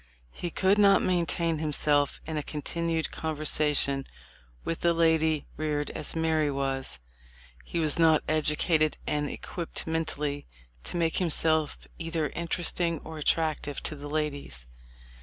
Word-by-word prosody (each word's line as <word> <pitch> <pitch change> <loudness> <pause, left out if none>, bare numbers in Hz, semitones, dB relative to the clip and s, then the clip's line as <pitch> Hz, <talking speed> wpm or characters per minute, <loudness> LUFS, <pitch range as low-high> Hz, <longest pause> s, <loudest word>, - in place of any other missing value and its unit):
He 175 - -5
could 190 +4 +2
not 200 -1 +6
maintain 170 -2 +1
himself 145 -2 +1
in 160 - -4
a 150 - 0
continued 160 +2 -2
conversation 150 -3 +2 0.6
with 165 - -3
a 170 0 +4
lady 160 -2 +2
reared 150 -1 -1
as 150 - -4
Mary 160 -2 +2
was. 135 - -2 0.6
He - - -5
was 155 0 +1
not 160 -2 +5
edu 155 -1 +1
cated 155 -3 +2
and 150 -1 0
equipped 170 -2 -5
mentally 150 -3 -2 0.4
to - - -2
make 165 -1 +1
himself 160 -3 +1
either 165 -2 -1
interesting 170 0 -1
or 160 -1 -7
attractive 150 -2 0
to 155 - 0
the 145 0 -8
ladies. 145 - -3
155 Hz, 135 wpm, -28 LUFS, 150-165 Hz, 0.6 s, not